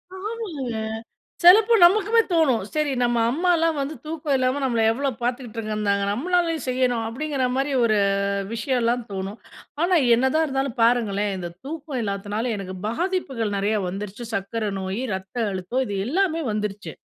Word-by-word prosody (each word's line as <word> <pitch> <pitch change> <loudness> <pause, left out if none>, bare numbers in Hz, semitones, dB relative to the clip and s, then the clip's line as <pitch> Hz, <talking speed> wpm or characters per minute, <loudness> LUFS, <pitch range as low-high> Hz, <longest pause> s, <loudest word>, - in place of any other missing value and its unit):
ஆமாங்க. 445 +4 -5 1.0
செலப்ப 425 +6 +8
நமக்குமே 430 +5 +5
தோணும். 310 -9 +3
சரி, 305 -2 0
நம்ம 240 -1 +2
அம்மாலாம் 330 0 +2
வந்து 280 +3 -3
தூக்கம் 305 -2 -1
இல்லாம 255 +2 0
நம்மள 235 -3 +1
எவ்ளோ 275 +4 -1
பாத்துகிட்டுகிருந்தாங்க 215 -5 -1
நம்மளாலயும் 330 - 0
செய்யணும். 250 -2 +1
அப்டிங்குற 270 +3 -2
மாரி 275 +2 0
ஒரு 215 -2 +3 0.6
விஷயம்லாம் 240 0 0
தோணும். 195 +2 -5 0.4
ஆனா, 360 +1 +3 0.2
என்னதான் 265 +6 +2
இருந்தாலும் 270 -3 -2
பாருங்களேன். 210 -4 +2
இந்த 175 -2 -5 0.2
தூக்கம் 295 -2 -5
இல்லாத்துனால 205 +3 -2
எனக்கு 190 -1 -6
பாதிப்புகள் 260 - -2
நெறயா 210 +2 +1
வந்துருச்சு. 205 +5 -6
சர்க்கர 210 +2 -2
நோயு, 190 +6 -3
ரத்த 190 +5 -9 0.2
அழுத்தம் 190 +8 -1
இது 200 - -3
எல்லாமே 330 +2 +1
வந்துருச்சு. 210 -1 -4
250 Hz, 135 wpm, -23 LUFS, 210-310 Hz, 1.0 s, செலப்ப